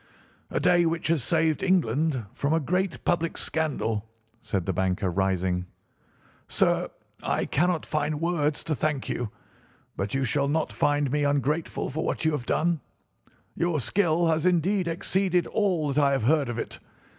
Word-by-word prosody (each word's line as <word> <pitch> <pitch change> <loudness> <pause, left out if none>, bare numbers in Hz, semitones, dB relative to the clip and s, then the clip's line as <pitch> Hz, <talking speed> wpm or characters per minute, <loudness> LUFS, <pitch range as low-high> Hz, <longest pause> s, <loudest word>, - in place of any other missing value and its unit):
"A - - -1
day 175 -1 +4
which 165 0 -1
has 160 -6 +2
saved 160 +2 +1
England 155 - +1
from 140 +2 0
a 165 - +3
great 180 +4 -1
public 170 -1 0
scandal," 115 -9 -1 0.3
said 100 -6 -2
the 95 - -1
banker, 95 +1 0
rising. 90 -1 0 0.8
"Sir, - - +2 0.3
I - - 0
cannot 175 +2 +1
find 150 0 -1
words 155 -3 0
to 160 - -1
thank 150 -2 -1
you, 120 -3 -2 0.7
but 100 +5 -3
you 135 - +1
shall 140 +3 +1
not 155 +2 0
find 145 -2 +1
me 150 +1 +1
ungrateful 145 +3 0
for 160 +4 -2
what - - -2
you 160 - +4
have 145 -5 -3
done. 170 -2 +1 0.7
Your 170 -2 0
skill 170 - +2
has 160 +1 +2
indeed 180 +2 +2
exceeded 180 +1 +1
all 180 -9 0
that 145 +1 +3
I 140 0 +3
have 135 - 0
heard 140 +1 +3
of 120 - -3
it. - - -5
150 Hz, 165 wpm, -26 LUFS, 130-170 Hz, 0.8 s, day